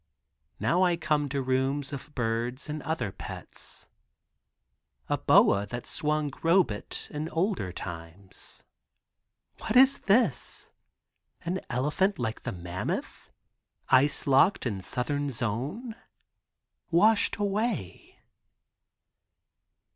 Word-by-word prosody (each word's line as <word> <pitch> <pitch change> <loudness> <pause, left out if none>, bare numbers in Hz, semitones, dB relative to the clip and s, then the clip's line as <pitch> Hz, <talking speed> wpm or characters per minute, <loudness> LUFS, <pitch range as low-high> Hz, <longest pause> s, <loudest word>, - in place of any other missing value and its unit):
Now 175 +2 +2
I 175 -2 +3
come 150 -3 0
to 140 0 -1
rooms 135 +2 0
of 140 +2 -8
birds 120 +2 -1
and 150 0 -4
other 140 -9 -2
pets. - - -6 1.2
A - - +3
boa 100 +1 +5
that 120 +3 -6
swung 150 -1 -1
Robet 165 - +1
in 150 +2 -4
olden 170 - -1
time. 90 +2 -8 1.3
What 220 - -3
is 265 +2 +7
this, 225 +5 +1 0.7
an 180 +2 -2
elephant 150 +11 +1
like 115 -2 -3
the 125 - -4
mammoth, 90 -1 -5 0.6
ice 135 +3 +4
locked 140 +7 +4
in 100 -6 -2
southern 145 +7 -1
zone. 135 - -3 1.0
Washed 205 +6 +4
away? 205 - -2
145 Hz, 100 wpm, -28 LUFS, 120-175 Hz, 1.3 s, is